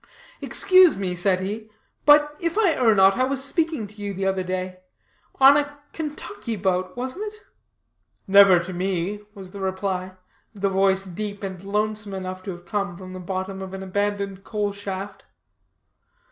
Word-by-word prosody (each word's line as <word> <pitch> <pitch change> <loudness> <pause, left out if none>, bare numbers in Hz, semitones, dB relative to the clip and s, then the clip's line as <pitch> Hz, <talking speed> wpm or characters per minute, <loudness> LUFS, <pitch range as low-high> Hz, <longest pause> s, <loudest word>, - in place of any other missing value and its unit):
"Excuse 370 - +5
me," 190 -2 -2
said 185 +1 +1
he, 215 +3 -5 0.4
"but, 295 0 +6
if 335 +2 -2
I 415 -6 +4
err 225 -6 +3
not, 195 +1 +5
I 255 - +2
was 270 0 -1
speaking 315 - -1
to 205 +1 -12
you 200 -1 -4
the 195 +1 -2
other 190 -1 +1
day; 185 0 -4 0.6
on 270 +1 +8
a 290 0 -2 0.2
Kentucky 300 - -5
boat, 185 0 -1
wasn't 305 +13 -4
it?" 430 0 -18 0.8
"Never 195 -1 +7
to 175 +2 -3
me," 185 +2 -2 0.2
was 190 -2 -10
the 200 - -9
reply; 190 -1 -2 0.4
the 200 0 0
voice 195 0 +2
deep 205 +3 -6
and 190 -2 -6
lonesome 210 0 -2
enough 185 0 -5
to - - -5
have 175 -1 -7
come 195 -2 -3
from 185 0 -9
the 185 - -7
bottom 190 +1 -4
of 190 0 -6
an 190 - -6
abandoned 200 0 -2
coal 210 -2 -2
shaft. 200 0 -6
195 Hz, 170 wpm, -24 LUFS, 190-220 Hz, 0.8 s, on